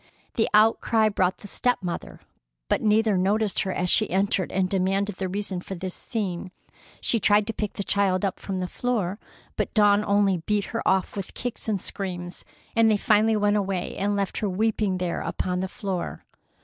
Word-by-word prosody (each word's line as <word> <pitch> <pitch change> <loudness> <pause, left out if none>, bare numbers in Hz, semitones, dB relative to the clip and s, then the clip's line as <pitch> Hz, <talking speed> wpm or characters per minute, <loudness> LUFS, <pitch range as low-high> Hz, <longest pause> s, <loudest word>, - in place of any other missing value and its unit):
The 225 - +1
outcry 220 +1 +4
brought 185 -2 +1
the 205 - -11
step 245 +1 0
mother, 175 -1 -5 0.5
but - - +2
neither 215 -2 +3
noticed 205 +2 +1
her 190 - 0
as 180 0 -1
she - - +3
entered 190 0 +1
and 190 0 +1
demanded 195 +1 0
the 190 -1 -2
reason 195 -1 -3
for 190 - -6
this 185 +1 -5
scene. 190 -6 -4 0.5
She 230 - +2
tried 205 0 +4
to 225 - -3
pick 210 -1 -3
the 200 - -4
child 195 -1 +2
up 190 - -2
from 190 -2 -4
the 180 - -2
floor, 210 -4 -2 0.4
but - - -2
Dawn 205 -1 +5
only 200 -2 +3
beat 205 +4 -1
her 230 - -1
off 190 -1 +1
with 195 -2 -6
kicks 245 -2 -4
and 205 -3 0
screams, 175 -2 -4 0.3
and 225 -1 +5
they 215 - +3
finally 215 +2 +3
went 205 0 +2
away 195 -3 -2
and 205 +1 0
left 200 -2 -2
her 210 - -1
weeping 210 0 0
there 180 -2 -2
upon 180 0 -2
the 190 - -1
floor. 190 -2 -4
200 Hz, 190 wpm, -25 LUFS, 185-210 Hz, 0.5 s, Dawn